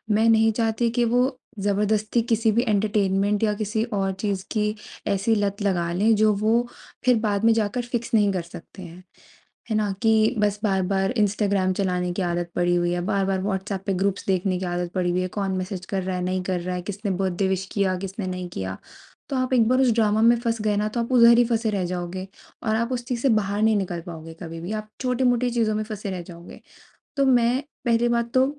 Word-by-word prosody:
मैं 225 +1 +3
नहीं 225 0 +5
चाहती 225 +1 0
कि 240 0 +1
वो 250 +3 +1 0.2
ज़बरदस्ती 210 +3 +1
किसी 225 -1 +1
भी 235 +3 +2
एंटरटेनमेंट 205 -1 +1
या 210 -1 +2
किसी 215 +1 -1
और 195 -1 0
चीज़ 195 -2 -2
की 210 -1 0 0.3
ऐसी 200 +3 +1
लत 205 -1 -1
लगा 175 -4 0
लें 215 +5 +3
जो 215 0 +4
वो 225 +4 +1 0.4
फिर 250 -1 +5
बाद 210 -1 -1
में 230 - +6
जाकर 225 +3 0
फिक्स 235 -1 -3
नहीं 205 -3 +4
कर 185 - -1
सकते 170 +2 -12
हैं, 175 +1 -11 0.7
है 220 - +1
ना? 210 -2 +1
कि 220 +2 +3
बस 210 -1 +1
बार-बार 195 -1 +1
इंस्टाग्राम 200 -2 +1
चलाने 180 -2 -1
की 190 - -2
आदत 175 -1 -2
पड़ी 175 0 +2
हुई 175 0 +1
है, 175 - -1
बार-बार 195 -1 0
वॉट्सऐप 195 0 -3
पे 200 - +1
ग्रुप्स 195 +1 -1
देखने 185 -1 0
की 190 - -4
आदत 175 0 -3
पड़ी 180 -2 0
हुई 180 +1 0
है, 185 - -1
कौन 195 0 -2
मैसेज 185 0 -5
कर 190 -2 -2
रहा 185 0 -3
है, 180 - -3
नहीं 185 +1 -1
कर 180 -1 -2
रहा 180 +1 -3
है, 180 - -3
किसने 200 +2 -4
बर्थडे 190 0 0
विश 190 0 -1
किया, 190 -2 +1
किसने 195 +1 -5
नहीं 185 -1 -4
किया। 95 - -5 0.5
तो 275 - -2
आप 255 0 -1
एक 235 -3 +4
बार 255 +1 +3
उस 255 -2 +4
ड्रामा 215 -1 +2
में 235 +1 +6
फँस 230 -2 -1
गए 210 -1 +1
ना 210 +1 0
तो 235 +3 -3
आप 235 - -3
उधर 235 -1 +7
ही 245 - +6
फँसे 230 -1 0
रह 195 -3 -1
जाओगे 180 +1 -4 0.4
और 220 -1 0
आप 235 +3 -1
उस 240 -1 -3
चीज़ 245 -2 -2
से 275 - +3
बाहर 210 -3 +1
नहीं 220 0 +4
निकल 180 -4 -2
पाओगे 165 -1 -8
कभी 165 -1 -7
भी। 175 +5 -5
आप 215 0 -4
छोटी-मोटी 250 -1 +1
चीज़ों 225 -3 +1
में 215 - -1
फँसे 210 -2 -6
रह 185 -2 -4
जाओगे। 170 0 -12 0.6
तो 275 - +3
मैं 250 +1 +3 0.2
पहली 235 0 +2
बात 235 0 0
तो 255 - +5
205 Hz, 225 wpm, -24 LUFS, 185-225 Hz, 0.7 s, उधर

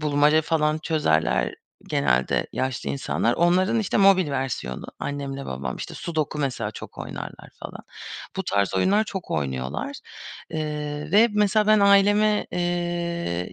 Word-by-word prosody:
bulmaca 150 +1 +3
falan 155 -1 +1
çözerler 80 - +1 0.3
genelde 65 -2 +1
yaşlı 130 -1 -2
insanlar. 125 -3 0
Onların, 185 +5 +3
işte, 210 - -1
mobil 195 -5 +5
versiyonu 130 - -3
annemle 140 -1 -4
babam. 65 -1 -4
İşte, - - -7
sudoku 155 -3 -3
mesela 125 -7 -2
çok - - -10
oynarlar - - -8
falan. - - -9 0.5
Bu - - -1
tarz 100 -1 0
oyunlar 200 - +3
çok 190 -4 -6
oynuyorlar, 65 -4 -3 0.5
eee, 150 -1 -4
ve 220 +4 +6
mesela 210 0 +2
ben 215 -1 +5
aileme, 205 +1 +4
eee, 175 - -2
150 Hz, 130 wpm, -24 LUFS, 120-185 Hz, 0.5 s, ve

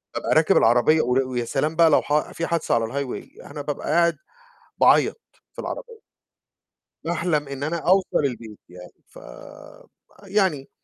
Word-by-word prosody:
بابقى - - -1
راكب - - +4
العربية، 125 +7 +4
ويا 125 -1 -1
سلام 150 +6 -1
بقى 165 0 +5
لو 145 - +4
ح 150 +1 -1
في 165 - -4
حادثة 165 -6 0
على 115 -1 +1
الhighway 135 +1 -6
أنا 145 0 -6
بابقى 145 0 -5
قاعد 170 0 +2 0.6
باعيّط - - +4 0.3
في - - -33
العربية. 485 -3 -7 1.0
باحلم 160 -3 -1
إن 140 0 -6
أنا 160 +3 -2
أوصل 180 -3 +1
البيت 115 -5 -6
يعني، 90 0 -14
فيعني 185 - -6
150 Hz, 140 wpm, -23 LUFS, 130-170 Hz, 1.0 s, بقى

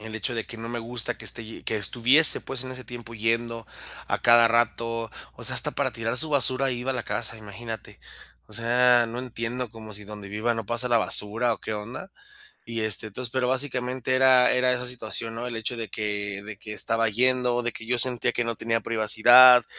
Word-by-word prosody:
el 110 0 -7
hecho 120 +2 -3
de 115 - -3
que 115 - -10
no 115 +1 -7
me 120 0 -4
gusta 115 0 -2
que - - -12
esté 115 - +2
ye 110 - -10
que 110 - -2
estuviese, 120 - +3
pues, 135 -1 -4
en 130 - -5
ese 130 0 -8
tiempo 115 0 -9
yendo 115 +1 -1 0.4
a - - 0
cada 120 -1 +6
rato. 115 -1 0 0.3
O - - -10
sea, - - 0
hasta - - +3
para - - -1
tirar 115 +1 -3
su 155 - -2
basura 135 -1 +2
ahí 125 -2 -2
iba 130 +2 -3
a - - -1
la 120 - -4
casa, 115 - -2
imagínate. 110 +1 -8 0.5
O - - -18
sea, 120 +1 +3
no 120 +2 -5
entiendo, 120 -1 -4
como 110 -1 -10
si 105 +1 -8
donde 105 -1 -9
viva 110 +3 -1
no 115 -2 -5
pasa 120 +3 -2
la 120 -1 +4
basura 110 +3 0
o, - - -14
¿qué - - -5
onda? 115 - -7 0.5
Y 115 -1 -4
este, 110 0 0
entonces, 115 +3 -7
pero 130 -1 0
básicamente 130 -1 -1
era 130 -1 +5
era 125 0 +2
esa 125 0 -2
situación, 115 -2 -4
¿no? 120 +1 -4
El 120 - -5
hecho 115 +2 -3
de 115 -2 -5
que 100 -1 -3
de 110 -1 -7
que 105 - -8
estaba 115 +1 0
yendo, 125 +2 +1
de 120 - -1
que 115 - -10
yo 125 +1 +1
sentía 120 -1 +4
que 120 - -1
no 115 -1 -2
tenía 115 0 -1
privacidad, 120 +2 +6
115 Hz, 225 wpm, -25 LUFS, 110-125 Hz, 0.5 s, cada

